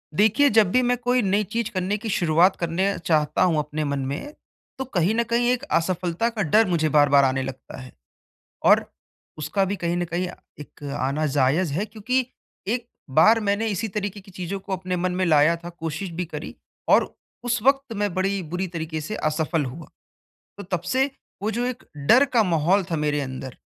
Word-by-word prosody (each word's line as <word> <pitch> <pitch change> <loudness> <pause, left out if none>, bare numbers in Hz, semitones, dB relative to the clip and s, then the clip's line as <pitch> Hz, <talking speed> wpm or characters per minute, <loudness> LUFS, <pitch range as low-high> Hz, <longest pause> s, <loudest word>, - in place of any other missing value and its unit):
देखिए, 220 - +4
जब 210 -4 +4
भी 255 - +4
मैं 245 0 +1
कोई 245 +1 +1
नई 205 0 +1
चीज़ 225 +2 -3
करने 190 +2 -1
की 220 +1 -5
शुरुआत 175 +1 +3
करना 185 +4 -1
चाहता 155 -3 +1
हूँ 175 -4 +2
अपने 150 +1 -3
मन 140 -1 -1
में, 140 - -4 0.4
तो 265 - -3
कहीं 200 -4 0
न 235 - +2
कहीं 235 +1 +1
एक 250 +1 -1
असफलता 180 - 0
का 225 -2 -4
डर 215 +7 +4
मुझे 165 -3 +1
बार-बार 145 -1 +5
आने 135 0 +1
लगता 130 -1 -8
है 125 - -11 0.7
और - - +6 0.5
उसका 155 +6 0
भी 195 +2 -2
कहीं 175 -2 -2
न 175 - 0
कहीं 180 +1 -1 0.3
एक 150 - -13 0.2
आना 140 +4 0
जायज़ 145 +4 +1
है 180 +8 -1
क्योंकि 235 +4 -1 0.4
एक 240 +2 -1 0.3
बार 225 +6 +6
मैंने 205 +1 0
इसी 210 +1 -2
तरीके 205 0 -4
की 195 - -16
चीज़ों 185 +1 -5
को 195 - -8
अपने 185 0 -3
मन 180 +1 -1
में 185 +1 0
लाया 155 +1 +4
था, 170 +1 -9
कोशिश 165 +2 -5
भी 175 +2 -3
करी 165 - -7 0.3
और - - +3 0.3
उस 245 -1 0
वक़्त 275 0 +2
मैं 205 -1 -1
बड़ी 195 +1 0
बुरी 180 +3 -3
तरीके 160 -2 -4
से 185 +8 -5
असफल 155 0 0
हुआ। 135 +6 -8 0.7
तो - - -6
तब 180 -3 -3
से, 260 +10 0 0.3
वो 215 - 0
जो 235 +3 -2
एक 250 -1 -5
डर 225 - +5
का 230 - +6
माहौल 180 +1 +2
था 165 - 0
मेरे 150 -1 0
अंदर, 130 -1 -6
185 Hz, 195 wpm, -24 LUFS, 155-215 Hz, 0.7 s, और